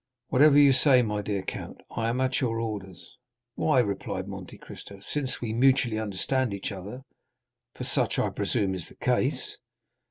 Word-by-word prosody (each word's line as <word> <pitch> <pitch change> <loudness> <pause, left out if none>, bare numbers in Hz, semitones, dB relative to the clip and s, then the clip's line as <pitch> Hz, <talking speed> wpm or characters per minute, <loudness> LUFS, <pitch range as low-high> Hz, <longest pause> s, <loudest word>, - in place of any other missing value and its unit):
"Whatever 145 +2 +6
you 140 -2 +7
say, 130 -1 +5
my 105 -2 -1
dear 100 -2 -2
count; - - -6
I 115 0 -1
am 120 +2 -1
at 130 0 +1
your 115 -3 0
orders." 100 -6 -6 0.4
"Why," 155 +1 +1
replied 100 -5 -2
Monte - - -8
Cristo, 100 -1 -11
"since 130 +5 -3
we 115 -3 -2
mutually 125 -2 +3
understand 110 +3 -1
each 100 - -5
other—for 105 +8 -12
such - - 0
I - - +1
presume 95 -2 -1
is 90 -3 -6
the - - -16
case?" - - -1
115 Hz, 160 wpm, -27 LUFS, 100-130 Hz, 0.4 s, you